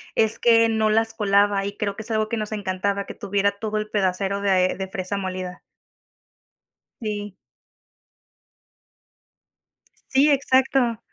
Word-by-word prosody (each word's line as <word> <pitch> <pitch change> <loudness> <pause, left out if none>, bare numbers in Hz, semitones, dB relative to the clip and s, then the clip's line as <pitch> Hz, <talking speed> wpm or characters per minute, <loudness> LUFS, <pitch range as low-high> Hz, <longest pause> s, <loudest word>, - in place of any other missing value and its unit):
es 220 0 +2
que 230 -1 +5
no 220 -1 +1
las 225 +1 +1
colaba 200 -2 +2
y 200 0 -5
creo 200 -1 -3
que 220 - -7
es 230 - -7
algo 215 0 0
que 230 - -2
nos 215 0 -4
encantaba 200 0 -2
que - - -8
tuviera 200 0 0
todo 215 +1 -4
el 215 0 -3
pedacero 195 0 -1
de 185 -2 +2
de 190 -1 -4
fresa 190 +1 -4
molida. 185 -1 -5 1.4
Sí. 205 -3 -4 2.7
Sí, 280 +3 +4
exacto. 260 -3 +2
205 Hz, 135 wpm, -23 LUFS, 195-225 Hz, 2.7 s, que